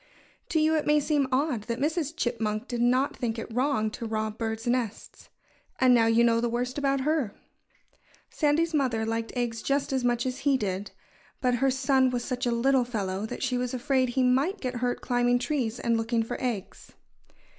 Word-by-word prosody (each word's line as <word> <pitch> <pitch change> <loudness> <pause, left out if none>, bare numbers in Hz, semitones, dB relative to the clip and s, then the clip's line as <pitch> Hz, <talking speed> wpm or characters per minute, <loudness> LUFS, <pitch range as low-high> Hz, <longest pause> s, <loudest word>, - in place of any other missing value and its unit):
To 320 - +2
you 310 +1 +3
it 310 -1 0
may 300 0 +5
seem 290 -2 +1
odd 260 -5 0
that 235 +1 -3
Mrs. 310 +1 -1
Chipmunk 225 -5 -2
did 240 -1 -3
not 255 +3 +2
think 235 -2 -2
it 225 0 -6
wrong 245 -4 +1
to 230 - -6
rob 220 0 -3
birds' 225 -1 -3
nests. 240 -3 -3 0.5
And 255 -1 +5
now 230 -2 +4
you 225 +1 +4
know 230 -1 +3
the 240 - 0
worst 250 +3 -2
about 275 -1 +1
her. 290 -7 0 0.9
Sandy's 320 +2 +1
mother 250 -7 +1
liked 225 0 -2
eggs 235 -2 -2
just 280 0 0
as 260 -2 0
much 240 0 +1
as 255 0 -3
he 275 -2 +2
did. 200 -3 -3 0.5
But 250 -2 +1
her 270 - +4
son 265 0 +2
was 245 -1 -2
such 250 -1 -2
a - - +1
little 255 +2 +3
fellow 205 -4 -3
that - - -6
she 250 -1 0
was 250 0 -2
afraid 260 0 +1
he 255 +2 +1
might 275 +11 +2
get 255 -2 -3
hurt 245 0 -1
climbing 245 0 +2
trees 245 -4 -2
and 235 -1 +1
looking 225 0 0
for 225 - -5
eggs. 230 -6 -4
245 Hz, 200 wpm, -27 LUFS, 230-270 Hz, 0.9 s, may